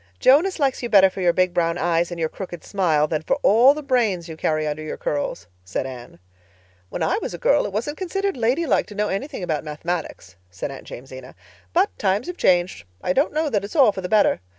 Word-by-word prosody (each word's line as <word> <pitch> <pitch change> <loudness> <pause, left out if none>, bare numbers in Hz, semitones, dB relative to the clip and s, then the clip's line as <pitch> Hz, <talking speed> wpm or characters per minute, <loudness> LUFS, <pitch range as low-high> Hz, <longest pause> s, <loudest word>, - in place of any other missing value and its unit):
"Jonas 315 +9 +4
likes 275 -4 0
you 240 - -3
better 195 -3 +6
for 190 - -6
your 175 -1 +4
big 185 +1 +1
brown 170 -1 +1
eyes 170 -1 +1
and 175 -1 -6
your 160 - +1
crooked 175 0 -8
smile 165 -7 +1
than 155 0 -2
for - - 0
all 245 +7 +6
the 305 - -6
brains 225 -11 0
you 160 - -7
carry 155 -1 -1
under 150 0 -3
your 155 - -5
curls," 145 -11 -3 0.2
said 95 +7 -3
Anne. 125 -6 -9 0.7
"When - - -3
I 400 - +1
was - - -4
a - - -7
girl - - +2
it - - -7
wasn't 240 +9 -3
considered 390 0 -2
lady 255 +7 +1
like 275 - +1
to 210 - -11
know 210 0 0
anything 195 +1 -4
about 155 -4 -2
Mathematics," 150 - -5
said 90 +9 -6
Aunt 135 - -10
Jamesina. 130 +1 -10 0.4
"But 90 - +1
times 195 +2 +1
have 355 +1 -6
changed. 175 - +2 0.2
I 180 - +1
don't 280 +4 +2
know 310 +1 0
that 205 -3 0
it's 200 - -8
all 270 -8 +6
for 190 - -6
the 180 - -5
better. 215 -2 +3
185 Hz, 230 wpm, -22 LUFS, 155-250 Hz, 0.7 s, better